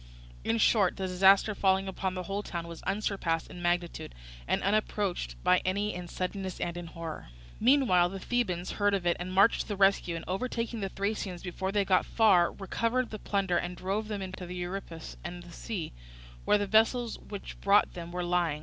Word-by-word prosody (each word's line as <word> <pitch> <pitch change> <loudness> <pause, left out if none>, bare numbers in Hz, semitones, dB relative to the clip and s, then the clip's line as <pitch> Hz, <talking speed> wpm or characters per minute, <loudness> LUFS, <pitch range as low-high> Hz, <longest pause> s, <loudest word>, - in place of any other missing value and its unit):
In 115 - +1
short, 195 - +3
the 190 - -2
disaster 195 +3 +5
falling 190 -1 +2
upon 190 0 -3
the 185 - -3
whole 200 +2 -3
town 170 -4 -5
was 170 -1 -9
unsurpassed 195 -5 -1
in 180 - -9
magnitude, 175 - -1 0.3
and - - 0
unapproached 200 - 0
by 180 - +5
any 205 +3 0
in 180 0 -6
suddenness 185 +1 -4
and 170 - -2
in 175 -1 -6
horror. 165 - -7 0.3
Meanwhile 230 -9 +4
the 195 +1 -6
Thebans 185 -7 -1
heard 205 -1 +2
of 185 -3 -3
it 175 - +3
and 180 +1 -4
marched 195 +4 +4
to - - -7
the 205 - -2
rescue, 195 -3 +3
and 165 - -6
overtaking 230 +3 -2
the 195 -2 -2
Thracians 200 -2 -3
before 190 +1 -3
they 205 0 +2
had 195 - -3
gone 185 - +5
far, 195 -6 +4
recovered 230 +5 -1
the 215 - -6
plunder 195 -4 0
and 175 0 -4
drove 200 +3 -2
them 205 -2 -3
in 185 - -6
panic 185 - -8
to 180 - -6
the 180 - -6
Euripus 175 -2 -6
and 175 -1 -6
the 175 - -13
sea, 195 -6 -5 0.5
where 210 - +5
the 205 - -1
vessels 225 +3 +2
which 205 -2 -9
brought 200 +1 +4
them 170 -1 -7
were 180 0 -3
lying. 175 -4 +1
190 Hz, 205 wpm, -30 LUFS, 175-205 Hz, 0.5 s, disaster